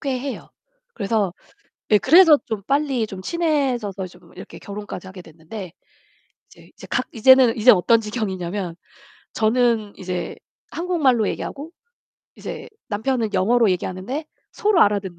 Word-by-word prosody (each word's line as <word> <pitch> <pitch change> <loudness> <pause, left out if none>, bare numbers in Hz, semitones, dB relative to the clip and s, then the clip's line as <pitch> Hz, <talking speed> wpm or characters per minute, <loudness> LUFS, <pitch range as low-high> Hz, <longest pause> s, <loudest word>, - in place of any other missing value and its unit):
꽤 265 -3 -2
해요. 270 +1 -6 0.4
그래서 205 -3 -1 0.6
예 210 - +6
그래서 320 - +7
좀 215 -3 -4
빨리 275 -3 0
좀 195 -3 -8
친해져서 260 - -1
좀 180 -1 -18
이렇게 - - -11
결혼까지 205 -2 -8
하게 185 -1 -10
됐는데 165 +3 -10 0.8
이제 - - -18
이제 - - -13
각 255 - -1
이제는 255 0 +5
이제 235 +3 +7
어떤 225 +4 +4
지경이냐면 190 -5 -4 0.6
저는 225 -2 +1
이제 180 -1 -4 0.4
한국말로 300 - +1
얘기하고 295 +4 -6 0.7
이제 - - -8 0.2
남편은 225 +1 -1
영어로 230 +2 +3
얘기하는데 185 - -3 0.3
서로 415 -5 +2
알아듣는. 200 -4 0
220 Hz, 310 characters per minute, -21 LUFS, 190-265 Hz, 0.8 s, 그래서